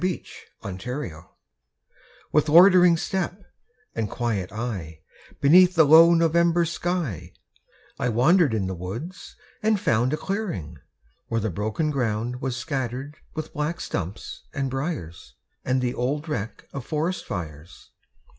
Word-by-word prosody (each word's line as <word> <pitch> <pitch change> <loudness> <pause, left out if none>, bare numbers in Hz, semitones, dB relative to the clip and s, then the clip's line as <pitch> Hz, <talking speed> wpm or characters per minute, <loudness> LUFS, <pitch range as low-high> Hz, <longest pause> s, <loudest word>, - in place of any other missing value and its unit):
IN 185 -2 0 0.6
NOVEMBER 95 - -5 1.0
With 150 +1 +2
loitering 180 +1 +7
step 190 +2 -2 0.5
and 110 -3 -2
quiet 110 -7 -2
eye, 100 -9 -5 0.4
Beneath 180 +5 +6
the 160 - +7
low 165 +3 +8
November 170 +1 +3
sky, 170 - -3 0.7
I - - 0
wandered 135 - +4
in 100 -3 -1
the 95 - -3
woods, 110 - -7 0.3
and 215 -1 +2
found 120 -4 +1
A 155 - 0
clearing, 110 - -4 0.5
where 115 - -1
the 110 -1 -2
broken 110 - -1
ground 120 -1 -2
Was 130 -2 -2
scattered 130 +2 -4 0.2
with 155 -1 -5
black 150 +3 -2
stumps 95 +3 -5
and 135 -2 -1
briers, 85 - -5 0.3
And 130 0 0
the 125 - 0
old 145 +6 -2
wreck 115 -8 -5
of 140 - -5
forest 160 +6 -2
fires. 80 -2 -7
135 Hz, 130 wpm, -25 LUFS, 110-165 Hz, 1.0 s, low